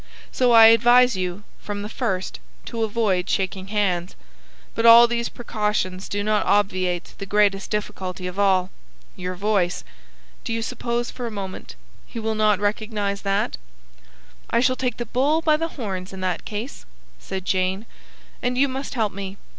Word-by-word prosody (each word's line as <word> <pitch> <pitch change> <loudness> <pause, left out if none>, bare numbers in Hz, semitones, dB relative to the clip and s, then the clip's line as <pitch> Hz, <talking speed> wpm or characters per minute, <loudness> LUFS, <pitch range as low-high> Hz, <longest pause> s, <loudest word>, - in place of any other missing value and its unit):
So 250 -1 +2
I 225 -1 +9
advise 240 +1 +5
you, 185 +1 -3 0.2
from 205 -1 -5
the - - -4
first, 210 -5 -3 0.3
to 230 -1 -3
avoid 205 -5 0
shaking 190 0 -2
hands. 190 -4 -1 0.6
But 230 - +2
all 230 +1 +10
these 235 0 -2
precautions 210 -5 -2
do 205 0 -2
not 215 0 +1
obviate 185 -3 0
the 195 - -6
greatest 200 -1 +2
difficulty 190 -3 -4
of 180 +2 -5
all, 190 -2 +2 0.4
your 180 0 -5
voice. 195 -2 0 0.6
Do - - -3
you 225 0 -2
suppose, 240 0 -3
for 245 -2 -5
a - - -3
moment, 195 -3 -7 0.3
he - - -10
will 220 0 -1
not 215 -2 +2
recognise 205 -1 -2
that?" 195 - -1 0.9
"I - - +2
shall 255 +1 +2
take 255 -1 -2
the 240 - -3
bull 275 +7 +1
by 315 -2 +3
the 330 +2 -1
horns 190 -6 -4
in 190 -1 -8
that 185 -1 -2
case," 220 +5 -6 0.4
said 185 - -6
Jane, 190 +3 0 0.6
"and 250 0 -1
you 280 +2 +4
must 270 +1 -5
help 220 -4 0
me. 195 0 -6
210 Hz, 165 wpm, -23 LUFS, 190-235 Hz, 0.9 s, all